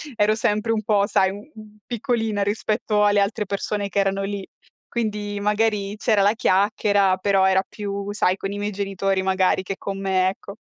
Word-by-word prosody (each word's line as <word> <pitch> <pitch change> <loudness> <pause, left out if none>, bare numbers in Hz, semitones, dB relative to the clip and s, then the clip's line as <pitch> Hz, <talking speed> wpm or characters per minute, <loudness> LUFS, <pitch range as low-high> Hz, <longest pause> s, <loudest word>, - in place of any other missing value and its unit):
ero 210 +1 +3
sempre 215 0 0
un 215 -1 -2
po' 205 -1 +2
sai, 200 +10 0 0.4
piccolina 225 -4 -1
rispetto 210 0 0
alle 205 0 +4
altre 205 +1 0
persone 200 0 -2
che 195 - -6
erano 195 0 +1
lì. 200 -1 -4 0.5
Quindi 210 -3 -2
magari 210 -1 0
c'era 215 -1 +2
la 200 +2 +4
chiacchiera, 200 -2 +2
però 195 0 +2
era 190 0 +3
più, 200 -1 -5
sai, 185 -3 +1
con 195 0 -5
i 200 - -5
miei 205 +1 -2
genitori 195 -1 -1
magari 190 0 +1
che 195 +1 -4
con 195 -1 -5
me, 190 -1 +2
ecco. 200 +2 -6
205 Hz, 175 wpm, -22 LUFS, 195-210 Hz, 0.5 s, alle